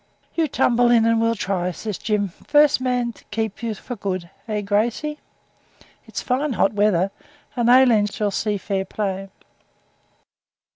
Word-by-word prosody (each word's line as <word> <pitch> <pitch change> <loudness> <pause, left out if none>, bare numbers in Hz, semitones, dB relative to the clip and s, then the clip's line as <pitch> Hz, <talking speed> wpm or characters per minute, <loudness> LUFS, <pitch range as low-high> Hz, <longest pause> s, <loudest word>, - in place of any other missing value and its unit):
'You 330 -2 +1
tumble 245 -3 +2
in 230 -2 +5
and 230 0 +3
we'll 230 0 +2
try,' 185 -3 -1
says 205 +3 -5
Jim; 210 -2 0
'first 295 - +3
man 250 -2 0
to - - -20
keep 220 0 -4
you 230 -2 -2
for 245 +5 -7
good 185 -4 -4 0.2
eh, 210 -1 -1
Gracey? 230 +9 -1 0.9
It's - - -5
fine 265 +2 0
hot 195 0 +2
weather, 200 -2 +2 0.4
and 240 -1 +1
Aileen 245 -5 +6
shall 210 0 -2
see 210 +1 -1
fair 195 0 -2
play.' 195 -1 -4
220 Hz, 150 wpm, -22 LUFS, 200-240 Hz, 0.9 s, Aileen